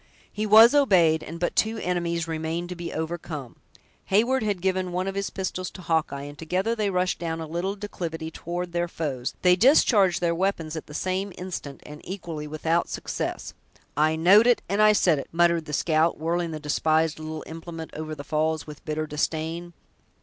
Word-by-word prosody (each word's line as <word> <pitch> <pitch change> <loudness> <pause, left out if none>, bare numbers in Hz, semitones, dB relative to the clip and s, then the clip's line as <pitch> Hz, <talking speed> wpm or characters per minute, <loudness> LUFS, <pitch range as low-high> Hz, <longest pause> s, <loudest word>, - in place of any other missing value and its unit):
He 215 +1 -2
was 220 +4 +8
obeyed; 180 - +4
and 165 +2 -8
but 175 - -1
two 220 +1 +1
enemies 170 -3 -1
remained 165 +2 -3
to 180 - -5
be 170 -1 -6
overcome. 160 -5 -5 0.5
Heyward 235 +6 +2
had 205 -3 -1
given 185 0 -1
one 180 +1 -1
of 195 - -2
his 200 0 -2
pistols 185 -1 -4
to 185 - -12
Hawkeye, 160 -4 0
and 145 0 -8
together 185 +7 0
they 210 -3 0
rushed 180 -1 0
down 165 -1 -3
a 160 - -4
little 175 +5 -3
declivity 165 -6 -5
toward 175 +2 -5
their 175 0 0
foes; 140 -7 -4
they 180 -1 +6
discharged 205 - +4
their 170 -1 +1
weapons 165 -3 -1
at 160 - -6
the 150 - -10
same 190 +3 -2
instant, 175 -6 -6
and 150 0 -10
equally 170 -5 -6
without 160 +3 0
success. - - -4 0.4
"I 155 +2 +3
know'd 195 +8 +6
it! 245 - +3
and 200 +2 +1
I 215 0 +7
said 175 -7 +3
it!" - - -6
muttered 170 -1 +2
the 150 - -7
scout, 160 +2 +2
whirling 170 +2 -1
the 155 -1 -5
despised 155 +1 +1
little 155 0 -6
implement 165 0 -8
over 155 0 -5
the 145 - -8
falls 155 +1 -1
with 150 -1 -11
bitter 155 -2 -2
disdain. 160 +3 -3
170 Hz, 190 wpm, -25 LUFS, 155-185 Hz, 0.5 s, was